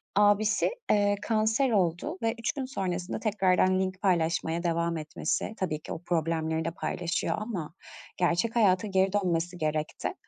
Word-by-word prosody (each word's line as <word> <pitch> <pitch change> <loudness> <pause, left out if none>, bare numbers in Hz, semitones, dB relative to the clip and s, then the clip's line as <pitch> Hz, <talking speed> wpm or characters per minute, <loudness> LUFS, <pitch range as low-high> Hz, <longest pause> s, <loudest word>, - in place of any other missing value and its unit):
Abisi, 205 - +3 0.2
eee, 205 -1 +3
kanser 220 +4 +2
oldu 190 - 0
ve 225 0 +1
üç 230 - 0
gün 275 -2 -3
sonrasında 185 -8 -3
tekrardan 190 -3 +2
link 185 0 -2
paylaşmaya 170 -2 +1
devam 170 -1 0
etmesi, 155 +6 -2
tabii 155 -5 -2
ki - - -6
o 165 - -8
problemleri 160 -1 -1
de 165 - -1
paylaşıyor 175 +1 -2
ama 195 -8 -5 0.4
gerçek 180 +6 +1
hayata 205 -3 +3
geri 190 -1 +2
dönmesi 175 -3 0
gerekti 155 -1 -2
185 Hz, 145 wpm, -28 LUFS, 165-210 Hz, 0.4 s, Abisi